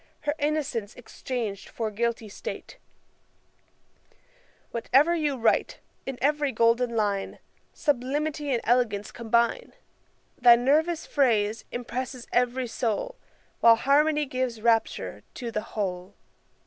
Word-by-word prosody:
Her 295 - -1
innocence 285 -8 -2
exchang'd 235 -4 -5
for 225 -2 -3
guilty 230 +1 -2
state; 470 - -8 1.9
Whatever 270 +8 +3
you 300 -5 0
write, 230 -2 +1 0.3
in 270 -2 -4
every 295 0 +2
golden 235 0 +2
line 205 -3 -1 0.3
Sublimity 290 +1 -1
and 240 -3 +1
elegance 220 -4 +1
combine; 235 - 0 0.7
Thy 240 -1 +8
nervous 310 +7 +1
phrase 225 -6 +1
impresses 245 +1 -5
every 250 +1 +1
soul, 235 - -2 0.5
While 230 -1 +7
harmony 295 +5 +3
gives 255 -3 -2
rapture 230 -1 +1
to 235 -2 -5
the 215 - -2 0.2
whole.' 185 -1 -3
245 Hz, 110 wpm, -26 LUFS, 230-285 Hz, 1.9 s, Thy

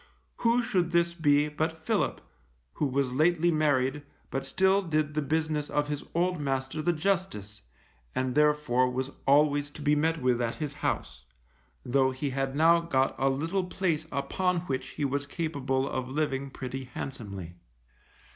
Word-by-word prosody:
Who 235 +1 +2
should 180 -6 +1
this 170 0 +2
be 150 -3 +3
but 160 +2 -3
Philip, - - 0 0.5
who 150 - 0
was 135 -1 0
lately 170 +4 +3
married, 145 -3 +1 0.3
but 135 - -2
still 190 +8 +3
did 155 -4 0
the 155 - 0
business 155 0 -1
of 145 0 0
his 145 -1 -3
old 180 0 +1
master 135 +2 -2
the 175 - +2
Justice, 170 - -2 0.5
and 130 -1 0
therefore 150 -4 +3
was 130 +2 -3 0.2
always 145 +1 +4
to 150 - -11
be 150 0 +3
met 160 +2 +1
with 125 -2 +1
at 115 -1 -1
his 150 -2 -4
house, - - -2 0.6
though 130 +1 +3
he 135 +2 -3
had 135 0 -2
now 165 +3 +5
got 135 -6 +1
a 135 - +3
little 165 +8 -1
place 170 -4 -1
upon 170 +6 0
which 130 -6 -3
he 145 - 0
was 140 +1 -2
capable 140 -4 -1
of 130 -2 -3
living 140 -1 -1
pretty 130 0 -6
handsomely. 100 -9 -7
145 Hz, 160 wpm, -28 LUFS, 135-160 Hz, 0.6 s, now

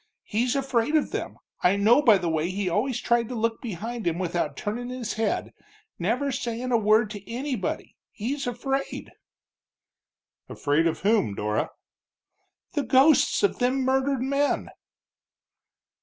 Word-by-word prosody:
He's 240 +4 0
afraid 270 0 +1
of 305 - +2
them, - - -4 0.2
I 180 +2 +4
know 220 +7 +5
by 225 -8 +6
the 175 -2 -3
way 160 +1 0
he 195 +1 -2
always 225 +8 0
tried 235 -2 +1
to 250 - -4
look 225 0 -1
behind 225 0 -5
him 170 0 0
without 175 -1 -2
turnin' 240 +4 -4
his 250 -3 -4
head, 220 +1 -1 0.5
never 240 +10 0
sayin' 245 0 -3
a 235 - +5
word 215 0 +3
to 205 0 -9
anybody, 250 -5 -3 0.2
he's 260 +5 -3
afraid." 270 +3 -3 1.4
"Afraid 150 +3 +1
of 160 - -2
whom, 200 - +2
Dora?" 105 +1 -1 1.0
"The 295 - +1
ghosts 280 +8 +4
of 405 - +2
them 255 +2 +1
murdered 265 0 +1
men!" 280 +2 0
235 Hz, 140 wpm, -26 LUFS, 200-260 Hz, 1.4 s, by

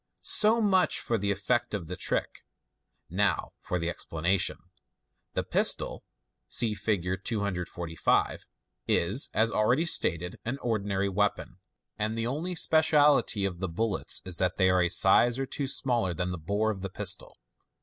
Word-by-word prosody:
So 220 +2 +5
much 190 -4 +2
for 115 -2 -2
the 100 +1 -2
effect 105 +3 -1
of 95 -5 -5
the 90 +3 -6
trick - - -3 0.7
5 - - -10
now 100 0 +1
for 90 - -3
the 85 -1 -3
explanation. 85 +2 -1 0.8
The - - 0
pistol - - 0 0.4
(see 115 -3 +1
Fig. 100 -4 -2 0.2
245) 90 -6 -2 0.4
is, 100 +11 +2
as 110 +1 +2
already 120 +11 +1
stated, 90 - +1
an 120 +4 -3
ordinary 100 -4 -1
weapon, 100 +1 -2 0.4
and 110 +2 -2
the 115 - -2
only 155 +9 -3
speciality 150 -10 +3
of 90 -3 -4
the 95 -1 -3
bullets 105 +3 -1
is 90 -2 0
that 90 -1 0
they 95 -1 +3
are 90 0 +2
a 90 - +1
size 120 +8 +5
or 135 - -2
two 140 +1 -3
smaller 120 -9 0
than 90 +1 -3
the 90 - -5
bore 100 +7 -1
of 95 -3 -7
the 95 - -4
pistol. - - -2
100 Hz, 160 wpm, -28 LUFS, 90-120 Hz, 0.8 s, So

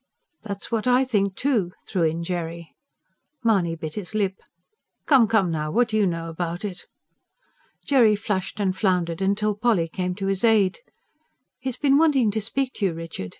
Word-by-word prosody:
"That's 200 0 -5
what 225 +1 -1
I 250 +1 +4
think, 200 -6 0
too," 220 -11 0
threw 185 - -1
in 165 +1 0
Jerry. 170 -1 -5 0.7
Mahony 190 -8 +2
bit 155 -1 -6
his 210 0 -6
lip. 200 -3 +1 0.7
"Come, 260 -6 +5
come, 210 -6 +2
now, 155 -1 -2
what 235 +7 +2
do 220 - -2
you 205 -2 +3
know 165 -1 -3
about 170 +3 -4
it?" 195 -3 -6 1.0
Jerry 235 -7 +4
flushed 200 -1 -3
and 190 -2 0
floundered, 180 -4 0 0.2
till 210 0 0
Polly 210 -6 +1
came 180 +2 -3
to 195 0 -4
his 195 +1 -1
aid. 215 -5 +3 0.8
"He's 260 -1 -4
been 280 0 +3
wanting 275 -9 +3
to 220 +1 -2
speak 255 +5 -2
to 205 - 0
you, 175 - -2
Richard. 165 - -6
200 Hz, 175 wpm, -24 LUFS, 175-225 Hz, 1.0 s, Come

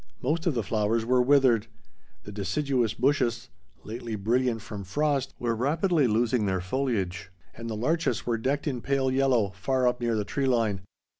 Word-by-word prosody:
Most 160 +6 0
of 160 - +1
the 115 - 0
flowers 110 +2 0
were 125 +1 +3
withered. 125 -4 +4 0.6
The 105 - -9
deciduous 120 +3 -1
bushes, 120 -2 0 0.3
lately 115 +1 -5
brilliant 115 +2 0
from 105 -3 -7
frost, 145 +6 -1
were 120 -1 -1
rapidly 155 - +2
losing 115 0 +1
their 95 -1 0
foliage, 95 -4 -2 0.2
and 115 0 -7
the 110 - -3
larches 130 +1 0
were 115 -2 0
decked 140 +5 -1
in 130 -6 -2
pale 135 0 0
yellow, 130 -6 +2
far 125 +7 0
up 125 0 0
near 120 -1 0
the 105 -1 -1
tree 135 +4 -1
line. 115 -6 +1
120 Hz, 170 wpm, -27 LUFS, 110-135 Hz, 0.6 s, withered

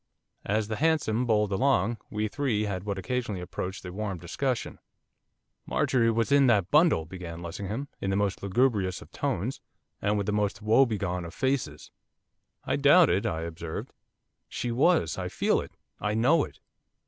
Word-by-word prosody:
As 105 +1 +1
the 110 -1 -3
hansom 140 -7 +1
bowled 105 -2 +2
along 115 0 +2
we 105 0 -1
three 115 -3 -1
had 100 -2 -3
what 100 -2 -2
occasionally 105 +1 -2
approached 90 +2 -5
a 90 - -6
warm 100 -2 -3
discussion. 120 +9 -3 0.9
'Marjorie 115 -3 +2
was 115 +3 0
in 140 -1 +6
that 100 -6 +2
bundle,' 150 - +4
began 85 -1 -8
Lessingham, 100 +10 -4
in 95 - -2
the 95 - +1
most 100 -2 0
lugubrious 100 -3 +1
of - - -20
tones, 125 +10 -2 0.4
and 105 +1 +1
with 100 - -1
the 105 - 0
most 105 -1 0
woebegone 105 -5 +2
of 85 -1 -9
faces. 130 - -2 0.7
'I - - 0
doubt 145 +4 +6
it,' 95 +3 +1
I 80 -1 -2
observed. 85 0 -6 0.6
'She 120 - -3
was, 130 - +2
I - - -2
feel - - +1
it, - - -10 0.3
I 105 0 -1
know 145 +8 +4
it. - - -15
105 Hz, 165 wpm, -28 LUFS, 95-125 Hz, 0.9 s, in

